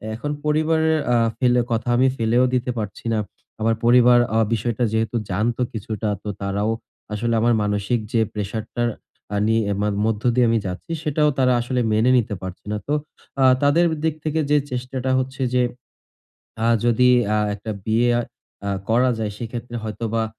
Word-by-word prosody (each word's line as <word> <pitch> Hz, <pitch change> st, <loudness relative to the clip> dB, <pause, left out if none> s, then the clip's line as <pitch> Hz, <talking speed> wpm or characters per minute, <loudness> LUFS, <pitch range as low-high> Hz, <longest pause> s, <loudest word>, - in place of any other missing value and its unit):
এখন 145 Hz, +6 st, -4 dB
পরিবারের 160 Hz, +1 st, +2 dB, 0.2 s
আ -, -, +4 dB, 0.2 s
ফেলে 125 Hz, -1 st, +3 dB
কথা 115 Hz, +1 st, -1 dB
আমি 130 Hz, +1 st, +4 dB
ফেলেও 115 Hz, +3 st, +3 dB
দিতে 125 Hz, 0 st, 0 dB
পারছি 105 Hz, +2 st, -6 dB
না। 110 Hz, -, +1 dB, 0.4 s
আমার 115 Hz, +1 st, +2 dB
পরিবার 120 Hz, 0 st, +6 dB, 0.2 s
আ -, -, +4 dB
বিষয়টা 115 Hz, +1 st, -1 dB
যেহেতু 110 Hz, +1 st, 0 dB, 0.2 s
জানতো 115 Hz, +6 st, 0 dB
কিছুটা 110 Hz, 0 st, -3 dB
তো 105 Hz, -, -4 dB
তারাও 100 Hz, +2 st, -1 dB, 0.4 s
আসলে 115 Hz, +2 st, -1 dB
আমার 120 Hz, +1 st, +3 dB
মানসিক 105 Hz, +3 st, 0 dB
যে 115 Hz, -, +3 dB
প্রেশার 105 Hz, +1 st, -3 dB
টার 120 Hz, 0 st, 0 dB, 0.5 s
আ -, -, +1 dB
নিয়ে 115 Hz, 0 st, +3 dB, 0.4 s
মধ্য 110 Hz, -1 st, -1 dB
দিয়ে 125 Hz, 0 st, +4 dB
আমি 115 Hz, -1 st, +2 dB
যাচ্ছি 90 Hz, -, -6 dB
সেটাও 150 Hz, 0 st, +2 dB
তারা 130 Hz, -1 st, +4 dB
আসলে 125 Hz, +1 st, -2 dB
মেনে 115 Hz, +4 st, +3 dB
নিতে 110 Hz, -3 st, 0 dB
পারছে 95 Hz, -1 st, -8 dB
না। 105 Hz, -, -1 dB
তো 145 Hz, -, 0 dB, 0.5 s
আ -, -, +5 dB, 0.2 s
তাদের 160 Hz, +5 st, +4 dB, 0.2 s
দিক 160 Hz, -2 st, +1 dB
থেকে 155 Hz, +1 st, 0 dB
যে 150 Hz, -, +5 dB
চেষ্টাটা 130 Hz, +1 st, -3 dB
হচ্ছে 130 Hz, +1 st, -4 dB
যে 125 Hz, -, +3 dB, 1.0 s
আ -, -, +3 dB, 0.2 s
যদি 125 Hz, +2 st, +4 dB, 0.3 s
আ -, -, +2 dB, 0.2 s
একটা 105 Hz, +2 st, -6 dB
বিয়ে 115 Hz, +2 st, +2 dB
আ -, -, +1 dB, 0.7 s
করা 125 Hz, +3 st, +4 dB
যায় 110 Hz, -2 st, -2 dB
সেক্ষেত্রে 120 Hz, +1 st, -6 dB
হয়তোবা 110 Hz, +1 st, -2 dB
120 Hz, 170 wpm, -22 LUFS, 110-125 Hz, 1.0 s, পরিবার